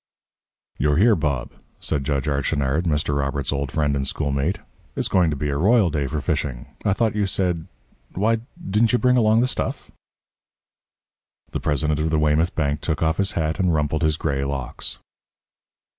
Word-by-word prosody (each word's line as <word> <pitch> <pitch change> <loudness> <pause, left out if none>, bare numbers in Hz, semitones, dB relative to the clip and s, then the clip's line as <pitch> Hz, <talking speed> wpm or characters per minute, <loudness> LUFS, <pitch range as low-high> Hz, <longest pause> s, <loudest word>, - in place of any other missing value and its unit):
"You're 75 0 +2
here, 110 +4 +5
Bob," 70 -7 -2 0.3
said 70 -3 -2
Judge 70 -1 0
Archinard, 70 +2 0
Mr. 75 -2 0
Robert's 70 0 -1
old 70 -2 -2
friend 75 -2 +1
and 70 -1 -1
schoolmate. 70 +4 -1 0.4
"It's - - 0
going 90 -3 +3
to 75 - -1
be 75 +1 -2
a 70 - -1
royal 100 +2 +4
day 70 -2 -1
for 75 +3 -2
fishing. 75 -5 -2 0.2
I 100 - +2
thought 110 +1 +1
you 105 -2 +1
said 90 -4 -1 0.5
why, 110 +4 +2 0.3
didn't 110 +4 +2
you - - +5
bring 125 0 +3
along 110 -1 +4
the 125 - +2
stuff?" - - -3 1.6
The - - -2
president 75 0 0
of 80 +1 0
the 80 - +1
Weymouth 75 +3 +2
Bank 75 -1 0
took 80 -2 -1
off 80 0 +1
his 100 +1 +1
hat 80 +2 -1
and 90 -3 +2
rumpled 75 +1 0
his 80 -2 +2
gray 70 -4 -1
locks. 70 -2 -4
75 Hz, 175 wpm, -23 LUFS, 70-90 Hz, 1.6 s, here